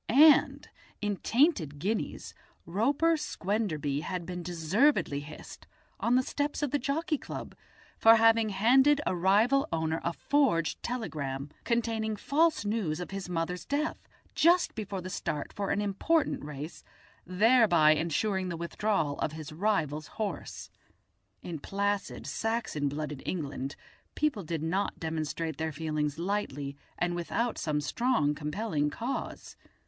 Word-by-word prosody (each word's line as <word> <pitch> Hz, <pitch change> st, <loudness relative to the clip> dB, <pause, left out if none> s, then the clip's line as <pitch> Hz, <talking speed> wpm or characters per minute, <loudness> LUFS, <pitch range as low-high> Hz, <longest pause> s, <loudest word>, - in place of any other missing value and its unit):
And 295 Hz, +5 st, +6 dB, 0.3 s
in 205 Hz, -1 st, -1 dB
Tainted 225 Hz, -, +2 dB
Guineas 205 Hz, +9 st, -3 dB, 0.3 s
Roper 280 Hz, -, +2 dB
Squenderby 190 Hz, -, -2 dB
had 180 Hz, +1 st, -4 dB
been 180 Hz, 0 st, -5 dB
deservedly 175 Hz, -, +2 dB
hissed, 145 Hz, +2 st, -11 dB, 0.3 s
on 235 Hz, +2 st, +2 dB
the 255 Hz, -, +4 dB
steps 290 Hz, +2 st, -2 dB
of 285 Hz, -, 0 dB
the 290 Hz, -, +1 dB
Jockey 305 Hz, +4 st, -1 dB
Club, -, -, -7 dB, 0.5 s
for 225 Hz, 0 st, +8 dB
having 225 Hz, -1 st, +4 dB
handed 260 Hz, +9 st, +4 dB
a -, -, 0 dB
rival 210 Hz, +10 st, +3 dB
owner 160 Hz, 0 st, -1 dB
a 170 Hz, -, 0 dB
forged 230 Hz, -, +1 dB
telegram, 145 Hz, -, -4 dB
containing 225 Hz, -2 st, 0 dB
false 310 Hz, +2 st, +2 dB
news 205 Hz, -7 st, -1 dB
of 180 Hz, -, -6 dB
his 195 Hz, -2 st, -5 dB
mother's 175 Hz, +1 st, -2 dB
death, 295 Hz, +3 st, -2 dB, 0.3 s
just 345 Hz, +2 st, +4 dB
before 200 Hz, -3 st, -4 dB
the 185 Hz, -, -6 dB
start 150 Hz, -6 st, -3 dB
for 200 Hz, -1 st, -3 dB
an -, -, +1 dB
important 210 Hz, +11 st, +1 dB
race, 150 Hz, +2 st, -7 dB, 0.4 s
thereby 185 Hz, -4 st, +5 dB
ensuring 185 Hz, +5 st, 0 dB
the 170 Hz, -, -4 dB
withdrawal 170 Hz, -3 st, -1 dB
of 155 Hz, -, -1 dB
his 155 Hz, -1 st, -7 dB
rival's 155 Hz, -5 st, 0 dB
horse. 215 Hz, -3 st, -4 dB, 0.7 s
In 170 Hz, -3 st, -5 dB
placid 200 Hz, +5 st, -2 dB
Saxon 220 Hz, -11 st, -1 dB
blooded 150 Hz, -1 st, -5 dB
England 145 Hz, -5 st, -4 dB, 0.4 s
people 300 Hz, -9 st, 0 dB
did 160 Hz, -2 st, -4 dB
not 185 Hz, +5 st, -1 dB
demonstrate 160 Hz, 0 st, -3 dB
their 160 Hz, 0 st, -1 dB
feelings 150 Hz, -1 st, -2 dB
lightly 165 Hz, -7 st, -2 dB, 0.2 s
and 175 Hz, 0 st, 0 dB
without 230 Hz, +7 st, -1 dB
some 150 Hz, -2 st, 0 dB
strong 150 Hz, -, +1 dB
compelling 150 Hz, +1 st, -1 dB
cause. 235 Hz, -, -5 dB
190 Hz, 135 wpm, -30 LUFS, 155-230 Hz, 0.7 s, for